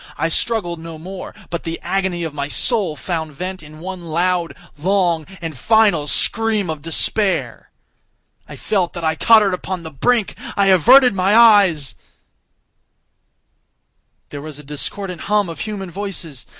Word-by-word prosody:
I 165 Hz, -, 0 dB
struggled 175 Hz, -2 st, -1 dB
no 165 Hz, 0 st, -8 dB
more, 185 Hz, +4 st, -8 dB, 0.2 s
but 170 Hz, -, -3 dB
the 165 Hz, 0 st, -5 dB
agony 185 Hz, -1 st, -1 dB
of 160 Hz, -3 st, -4 dB
my 140 Hz, -1 st, -3 dB
soul 195 Hz, -, +1 dB
found 160 Hz, +1 st, -4 dB
vent 185 Hz, +5 st, -5 dB
in 155 Hz, 0 st, -13 dB
one 185 Hz, +1 st, -7 dB
loud, 170 Hz, +1 st, 0 dB, 0.2 s
long, 170 Hz, -1 st, 0 dB
and 165 Hz, -3 st, -5 dB
final 210 Hz, -, +3 dB
scream 215 Hz, +1 st, 0 dB
of 155 Hz, -2 st, -6 dB
despair. 190 Hz, +5 st, -1 dB, 0.8 s
I -, -, -8 dB
felt 190 Hz, -5 st, -1 dB
that 170 Hz, -, -6 dB
I 160 Hz, 0 st, +2 dB
tottered 210 Hz, +3 st, +5 dB
upon 180 Hz, -1 st, -4 dB
the 160 Hz, -, -8 dB
brink—I 200 Hz, -, 0 dB
averted 245 Hz, -, +6 dB
my 195 Hz, +2 st, +2 dB
eyes— 200 Hz, -, +5 dB, 2.4 s
There 145 Hz, -, -7 dB
was 155 Hz, -1 st, -8 dB
a 150 Hz, -, -11 dB
discordant 175 Hz, +6 st, -5 dB
hum 205 Hz, -3 st, +2 dB
of 165 Hz, -, -8 dB
human 200 Hz, -4 st, -5 dB
voices! 175 Hz, -9 st, -6 dB
180 Hz, 145 wpm, -19 LUFS, 160-200 Hz, 2.4 s, averted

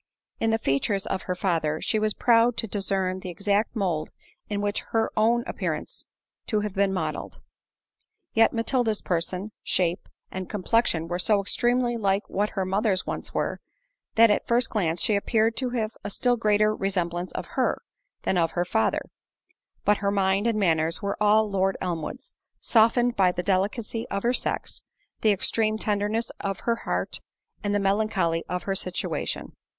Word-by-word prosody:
In 225 Hz, -, +1 dB
the 225 Hz, -, +3 dB
features 195 Hz, +3 st, 0 dB
of 190 Hz, -, -2 dB
her 180 Hz, -, +1 dB
father 165 Hz, -4 st, 0 dB
she 220 Hz, -, 0 dB
was 215 Hz, 0 st, 0 dB
proud 235 Hz, 0 st, +4 dB
to -, -, 0 dB
discern 190 Hz, -2 st, -1 dB
the 185 Hz, -, -7 dB
exact 200 Hz, +5 st, 0 dB
mould 175 Hz, -7 st, -1 dB, 0.4 s
in 205 Hz, -1 st, -1 dB
which 205 Hz, 0 st, 0 dB
her 225 Hz, -1 st, +2 dB
own 235 Hz, +2 st, +3 dB
appeared -, -, -2 dB, 0.6 s
to 215 Hz, -3 st, +1 dB
have 210 Hz, -2 st, -3 dB
been 195 Hz, 0 st, +2 dB
modelled; 190 Hz, -, -3 dB, 0.9 s
yet 225 Hz, 0 st, +5 dB
Matilda's 230 Hz, -2 st, 0 dB
person, 180 Hz, +4 st, -2 dB
shape, 175 Hz, -1 st, 0 dB, 0.2 s
and 185 Hz, -1 st, -5 dB
complexion 200 Hz, -5 st, +1 dB
were 175 Hz, +1 st, -2 dB
so 205 Hz, +2 st, +3 dB
extremely 240 Hz, +4 st, +1 dB
like 195 Hz, -2 st, 0 dB
what 205 Hz, +2 st, 0 dB
her 190 Hz, -, +1 dB
mother's 195 Hz, 0 st, +1 dB
once -, -, -5 dB
were, -, -, -1 dB, 0.6 s
that 230 Hz, -1 st, +7 dB
at -, -, +2 dB
the -, -, -38 dB
first 240 Hz, 0 st, +2 dB
glance 175 Hz, -6 st, 0 dB
she 215 Hz, -, +3 dB
appeared 225 Hz, +2 st, +2 dB
to 255 Hz, -2 st, -1 dB
have 225 Hz, -3 st, -1 dB
a 205 Hz, -, -3 dB
still 245 Hz, +4 st, +1 dB
greater 215 Hz, -1 st, +3 dB
resemblance 180 Hz, -3 st, -2 dB
of -, -, -4 dB
her, -, -, +1 dB, 0.4 s
than 185 Hz, -, +1 dB
of 165 Hz, -1 st, +1 dB
her 175 Hz, 0 st, 0 dB
father—but 185 Hz, -, -2 dB
her 200 Hz, -, 0 dB
mind 195 Hz, +2 st, +2 dB
and 230 Hz, -2 st, +1 dB
manners 165 Hz, -3 st, +1 dB
were 200 Hz, 0 st, -1 dB
all 215 Hz, +1 st, +5 dB
Lord 195 Hz, -1 st, 0 dB
Elmwood's; 180 Hz, -, -4 dB, 0.3 s
softened 240 Hz, +2 st, +3 dB
by 185 Hz, -2 st, +4 dB
the 180 Hz, -, -3 dB
delicacy 205 Hz, +4 st, -1 dB
of 200 Hz, -, -2 dB
her 240 Hz, +1 st, +2 dB
sex, -, -, -2 dB, 0.4 s
the 220 Hz, -, +4 dB
extreme 215 Hz, +2 st, +1 dB
tenderness 210 Hz, +2 st, -1 dB
of 195 Hz, -1 st, -3 dB
her 235 Hz, -1 st, 0 dB
heart, -, -, -1 dB, 0.4 s
and 205 Hz, 0 st, 0 dB
the -, -, +3 dB
melancholy 195 Hz, -4 st, +1 dB
of 180 Hz, 0 st, -2 dB
her 195 Hz, -, -1 dB
situation. 185 Hz, -1 st, -3 dB
205 Hz, 170 wpm, -26 LUFS, 185-225 Hz, 0.9 s, that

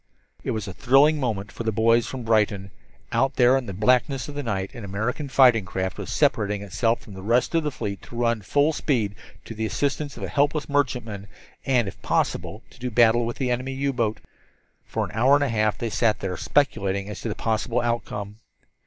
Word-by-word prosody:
It -, -, -4 dB
was 110 Hz, -3 st, -2 dB
a 95 Hz, -, -6 dB
thrilling 145 Hz, +8 st, +4 dB
moment 105 Hz, -6 st, -2 dB
for -, -, -8 dB
the 110 Hz, -, 0 dB
boys 115 Hz, +2 st, +3 dB
from 130 Hz, -2 st, -6 dB
Brighton. 105 Hz, -3 st, +1 dB, 0.4 s
Out 135 Hz, 0 st, +1 dB
there 125 Hz, +1 st, +5 dB
in 130 Hz, -3 st, -1 dB
the -, -, -4 dB
blackness 125 Hz, +6 st, +2 dB
of 145 Hz, -, -7 dB
the 145 Hz, -, -3 dB
night 95 Hz, -6 st, -3 dB
an 120 Hz, -, -8 dB
American 110 Hz, +9 st, -3 dB
fighting 125 Hz, -4 st, +5 dB
craft 95 Hz, -1 st, -4 dB
was -, -, -6 dB
separating 105 Hz, -1 st, +1 dB
itself 115 Hz, +4 st, 0 dB
from 105 Hz, -, -13 dB
the 95 Hz, -, -9 dB
rest 120 Hz, -, +1 dB
of 165 Hz, -, +3 dB
the 150 Hz, -, 0 dB
fleet 100 Hz, -7 st, -5 dB
to -, -, -12 dB
run 115 Hz, -2 st, +1 dB
full 145 Hz, +10 st, +2 dB
speed 115 Hz, -10 st, 0 dB, 0.3 s
to -, -, -7 dB
the 110 Hz, 0 st, -2 dB
assistance 145 Hz, +3 st, -2 dB
of -, -, -7 dB
a -, -, -2 dB
helpless 145 Hz, +1 st, +1 dB
merchantman, 120 Hz, -8 st, -1 dB, 0.4 s
and, 125 Hz, -5 st, +3 dB
if 95 Hz, -, -8 dB
possible, 110 Hz, -, -1 dB
to -, -, -18 dB
do 125 Hz, 0 st, -3 dB
battle 120 Hz, 0 st, +4 dB
with 120 Hz, -, -4 dB
the 130 Hz, -2 st, -1 dB
enemy 130 Hz, +2 st, -2 dB
U 140 Hz, +1 st, -1 dB
boat. 115 Hz, -3 st, -1 dB, 0.7 s
For -, -, -2 dB
an -, -, -9 dB
hour 130 Hz, +6 st, +4 dB
and 145 Hz, -, +2 dB
a 140 Hz, -, 0 dB
half 110 Hz, -2 st, +1 dB
they 115 Hz, -2 st, -3 dB
sat 110 Hz, -1 st, +1 dB
there, 95 Hz, -2 st, -3 dB
speculating 100 Hz, -, 0 dB
as 105 Hz, -, -7 dB
to 115 Hz, -, -3 dB
the 105 Hz, -, -3 dB
possible 115 Hz, +2 st, -1 dB
outcome. 105 Hz, -3 st, -3 dB
115 Hz, 215 wpm, -24 LUFS, 105-130 Hz, 0.7 s, there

